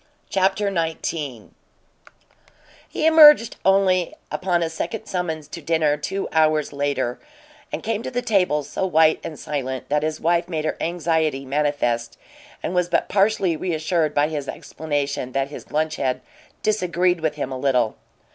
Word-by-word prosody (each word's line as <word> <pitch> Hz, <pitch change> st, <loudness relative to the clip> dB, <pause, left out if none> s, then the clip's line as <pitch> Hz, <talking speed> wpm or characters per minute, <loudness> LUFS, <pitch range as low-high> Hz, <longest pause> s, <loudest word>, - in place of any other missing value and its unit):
CHAPTER 195 Hz, +1 st, +1 dB
XIX 160 Hz, -, -3 dB, 1.4 s
He -, -, -2 dB
emerged 300 Hz, -7 st, +7 dB
only 190 Hz, -2 st, +3 dB, 0.2 s
upon 175 Hz, -2 st, 0 dB
a 165 Hz, -, -1 dB
second 175 Hz, +6 st, -4 dB
summons 160 Hz, -5 st, -3 dB
to 170 Hz, -, -7 dB
dinner, 155 Hz, -1 st, +2 dB
two 170 Hz, +7 st, -3 dB
hours 155 Hz, -2 st, +2 dB
later, 140 Hz, -3 st, -1 dB, 0.5 s
and -, -, -4 dB
came 220 Hz, 0 st, -1 dB
to -, -, -4 dB
the 245 Hz, -1 st, -2 dB
table 180 Hz, -10 st, +2 dB
so 145 Hz, +6 st, -4 dB
white 160 Hz, -4 st, +4 dB
and 155 Hz, -, -6 dB
silent 130 Hz, -3 st, -4 dB
that 150 Hz, +1 st, +2 dB
his 155 Hz, 0 st, -2 dB
wife 170 Hz, +1 st, +1 dB
made 155 Hz, -3 st, -2 dB
her -, -, -1 dB
anxiety 160 Hz, -4 st, 0 dB
manifest 130 Hz, -5 st, -1 dB, 0.5 s
and -, -, -2 dB
was 180 Hz, -1 st, +1 dB
but 170 Hz, -, +1 dB
partially 195 Hz, -3 st, +2 dB
reassured 160 Hz, -1 st, -1 dB
by 145 Hz, +1 st, +3 dB
his 150 Hz, -3 st, -4 dB
explanation 145 Hz, -4 st, -3 dB
that 135 Hz, 0 st, 0 dB
his 145 Hz, -, -10 dB
lunch 155 Hz, +1 st, 0 dB
had 130 Hz, -2 st, -1 dB, 0.4 s
"disagreed" 180 Hz, -4 st, +1 dB
with 155 Hz, -2 st, -1 dB
him 140 Hz, -3 st, -4 dB
a 130 Hz, -, -3 dB
little. 125 Hz, -5 st, +1 dB
160 Hz, 155 wpm, -22 LUFS, 145-180 Hz, 1.4 s, emerged